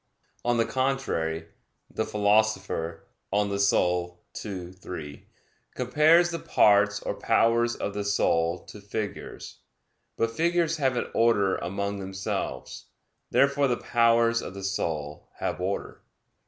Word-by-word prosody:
On 120 0 +1
the 115 - +3
contrary, 130 -12 -1 0.5
The - - -1
Philosopher 100 -5 +1 0.3
(De 100 - +1
Anima 100 -3 +2 0.4
ii, 90 -4 -6
3) 80 -5 -9 0.5
compares 155 +7 +4
the 170 - -3
parts 105 0 +3
or - - -2
powers 115 +1 +2
of 100 - -4
the 105 0 -3
soul 85 -4 +1
to 105 - -11
figures. 100 +1 -6 0.6
But 115 0 +1
figures 170 +3 +1
have 130 -4 +1
an - - 0
order 105 -5 +3
among 100 +3 -3
themselves. 95 -9 -4 0.4
Therefore 140 0 +3
the 120 -2 0
powers 115 0 +3
of 95 - -8
the 100 - -7
soul 80 -6 -3
have - - -3
order. 95 +2 -3
105 Hz, 125 wpm, -27 LUFS, 95-120 Hz, 0.6 s, compares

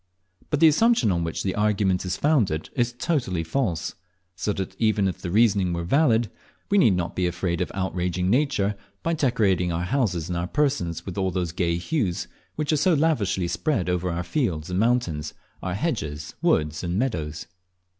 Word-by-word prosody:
But 150 - 0
the 165 - +9
assumption 155 - +4
on 85 -2 0
which 80 -1 -3
the 95 - -1
argument 100 -3 +1
is 90 0 -2
founded 115 - +1
is 120 -1 +1
totally 120 - -1
false, 90 -2 -1 0.4
so 105 - -1
that 95 -2 -5
even 110 -3 +2
if 90 - -3
the 90 - -5
reasoning 100 -3 +3
were 85 0 -2
valid, 120 - +2 0.4
we 205 - +5
need 110 - +5
not 90 -2 -3
be 90 -1 +1
afraid 85 0 -2
of 90 - -2
outraging 90 -1 -1
nature, 110 -4 +1 0.3
by 165 - +1
decorating 105 - +1
our 85 +1 -1
houses 90 - 0
and 90 - -3
our 85 +1 -2
persons 90 - -1
with 95 0 -4
all 95 -1 +1
those 90 -2 -2
gay 85 -1 0
hues 95 - -1 0.3
which 150 0 0
are - - +3
so 165 +4 +3
lavishly 105 - +1
spread 100 - -1
over 90 0 -1
our 85 +1 -2
fields 85 - -1
and 90 - 0
mountains, 105 -11 0 0.3
our 90 0 -3
hedges, 80 - -3
woods, 75 +1 +1
and 85 +1 -1
meadows. 80 - -2
95 Hz, 185 wpm, -25 LUFS, 85-125 Hz, 0.4 s, the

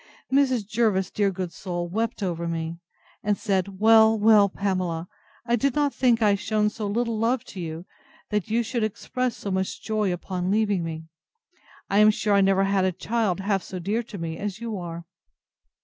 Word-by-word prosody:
Mrs. 260 -5 +3
Jervis, 215 -4 +1
dear 205 -1 +1
good 185 -2 -4
soul! 175 -2 -4
wept 220 +4 -2
over 170 -2 -2
me, 165 0 -3 0.4
and 205 -1 0
said, 195 -2 -1
Well, 220 0 +6
well, 210 -1 +5
Pamela, 185 -4 -2 0.4
I 235 0 +2
did 250 +2 0
not 290 -1 +1
think 240 -3 +2
I 210 - +5
had 200 -1 +2
shewn 210 -1 +1
so 215 -1 -4
little 230 +1 -1
love 235 +2 +1
to 195 - -8
you, 160 -2 -4
as - - -16 0.5
that 210 -2 -1
you 230 +2 +1
should 235 0 -2
express 245 +3 -2
so 200 - -5
much 190 0 -2
joy 215 -3 0
upon 180 +1 -3
leaving 205 -3 +1
me. 160 -1 -5 0.8
I 200 - +2
am 215 0 +7
sure 210 0 +1
I 200 - +5
never 195 0 +3
had 195 -1 +2
a 185 - +2
child 195 0 -1
half 195 -1 0
so 185 - -7
dear 200 +6 -1
to 220 -3 -9
me 165 -2 -5
as 205 0 -4
you 230 -2 -4
are. 170 -1 -7
205 Hz, 195 wpm, -25 LUFS, 185-220 Hz, 0.8 s, am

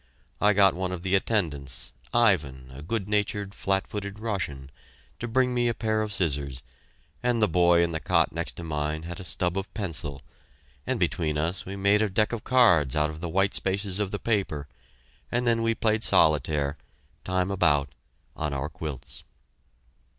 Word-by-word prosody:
I 105 0 +5
got 100 -2 +5
one 90 +1 -3
of 90 -1 -5
the 95 0 -1
attendants, 80 - 0 0.2
Ivan, 75 - +2
a 70 - -9
good 100 +5 -3
natured, 105 -1 -1
flat 95 -1 0
footed 100 0 -6
Russian, 85 -12 -4 0.5
to 120 - -3
bring 125 +1 +2
me 120 -1 +2
a 120 - 0
pair 110 -1 0
of 105 -1 -3
scissors, 70 -8 -1 0.6
and 120 -1 +1
the 105 - +4
boy 85 0 +4
in 85 - 0
the 80 - -2
cot - - +2
next - - -4
to 85 - -7
mine 75 0 -2
had 85 +1 -6
a - - -7
stub 90 +1 +1
of 95 0 -7
pencil, 75 - -4 0.6
and - - 0
between 75 -3 0
us 85 +5 -1
we 95 - -5
made 100 +2 +3
a 110 - +1
deck 105 +4 +1
of 115 - -4
cards 90 - +4
out 75 0 +2
of 80 +1 -10
the 85 - -3
white 95 +3 +1
spaces 95 0 0
of 105 -2 0
the 100 - -3
paper, 95 -11 -1 0.6
and 120 +1 0
then 115 -1 +2
we 115 0 +1
played 110 0 +1
solitaire, 75 -4 +3 0.5
time 95 +1 0
about, 75 -7 +2 0.5
on 75 -2 -3
our 70 +2 -3
quilts. 75 -3 -7
95 Hz, 180 wpm, -26 LUFS, 75-105 Hz, 0.6 s, I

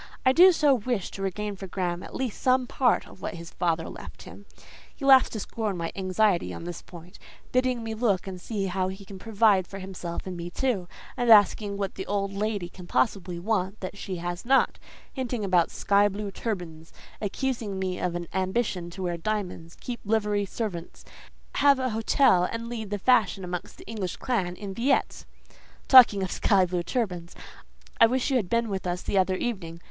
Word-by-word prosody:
I 260 - +6
do 360 +7 +8
so 300 -5 +4
wish 240 -4 -2
to 195 - -8
regain 205 +2 -3
for 195 0 -8
Graham 175 -1 -2
at - - -10
least 260 -5 -3
some 255 0 +3
part 245 0 +1
of - - -15
what - - -4
his 170 0 -9
father 165 -2 -1
left - - -10
him. - - -13 0.5
He 275 - -6
laughs 265 -2 +7
to 220 - -5
scorn 210 -2 -3
my 165 -1 -3
anxiety 190 0 +1
on - - -8
this 175 -1 -6
point, 175 +2 -13 0.3
bidding 255 -2 +1
me 225 0 -4
look 215 -5 +1
and 185 -2 -7
see 205 -1 -3
how 185 0 -1
he 190 +1 -7
can 190 -1 -10
provide 205 -3 +3
for 195 - -8
himself 185 -3 -6
and 185 -1 -5
me 170 0 -5
too, 200 -3 -1 0.3
and 245 -1 0
asking 205 -1 +5
what 195 -1 -2
the 190 - -6
old 200 -1 -1
lady 205 -2 -2
can 180 0 -12
possibly 185 -6 0
want 195 +1 -1
that 185 +1 -5
she 195 -1 -5
has 175 0 -4
not; 265 +2 +3 0.3
hinting 245 -5 -3
about 180 -3 +3
sky 205 0 +3
blue 205 0 -5
turbans; 175 -7 -5 0.3
accusing 220 -1 -2
me 185 -1 -2
of 180 -1 -2
an 175 -1 -4
ambition 190 -1 -1
to 185 +2 -7
wear 175 -1 -1
diamonds, 180 -3 -4
keep 245 -1 -5
livery 210 -1 +1
servants, 190 -5 -5 0.5
have 280 -1 +5
an 260 -1 -1
hotel, 220 -4 +3
and 230 0 -4
lead 220 -4 -5
the 205 - -2
fashion 210 -3 +3
amongst 180 -1 -6
the - - -13
English 205 -5 -4
clan 190 -9 -1
in 200 0 -7
Villette. 260 +7 0 0.6
"Talking 235 -7 +8
of 185 - -3
sky 195 -3 +3
blue 180 0 -2
turbans, 180 -4 -3 0.6
I 230 - +8
wish 260 +3 0
you 265 - +4
had 200 -7 -2
been 230 0 +1
with 195 -3 -3
us 175 0 -2
the 195 - +1
other 185 0 +2
evening. 185 -7 -4
200 Hz, 195 wpm, -27 LUFS, 180-230 Hz, 0.6 s, do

